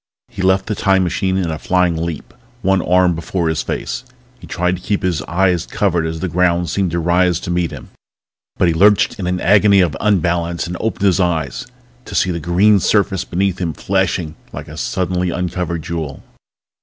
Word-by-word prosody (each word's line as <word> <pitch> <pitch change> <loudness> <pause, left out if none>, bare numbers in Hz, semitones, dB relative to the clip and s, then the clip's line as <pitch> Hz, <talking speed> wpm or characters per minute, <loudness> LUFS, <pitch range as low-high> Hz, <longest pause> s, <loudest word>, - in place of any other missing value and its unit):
He 95 - -7
left 95 +1 +2
the 110 - -2
Time 95 -2 +2
machine 95 +2 0
in 90 -4 -1
a 80 - -4
flying 90 -2 +1
leap, 80 -2 -5 0.3
one 95 -1 +2
arm 90 0 +3
held - - -2
before 85 0 -2
his 80 0 0
face. - - -4 0.4
He - - -12
tried 90 +1 -1
to - - -14
keep 100 +1 -2
his 90 -4 0
eyes 90 -1 +1
covered 85 -5 0
as 80 0 -5
the 95 - -1
ground 90 -1 +1
seemed 95 -2 0
to 85 +1 -2
rise 90 +1 +2
to - - -4
meet 85 -1 0
him. 70 -4 -10 0.7
But 90 - +3
he 85 - +2
lurched 100 +6 +3
in 90 - -3
an 90 0 -1
agony 100 +2 +4
of 85 -4 +2
unbalance 85 -4 0
and 90 - -5
opened 105 -2 -2
his 95 -1 +3
eyes 80 - -1 0.4
to - - -8
see 90 - +2
the 85 - -3
green 95 +6 +3
surface 95 -1 +1
beneath 95 +1 -1
him 85 -3 -1
flashing 90 -4 -1 0.2
like - - -8
a 75 - -10
suddenly 90 +2 -1
uncovered 90 -2 -3
jewel. 80 -4 -5
90 Hz, 200 wpm, -18 LUFS, 85-95 Hz, 0.7 s, agony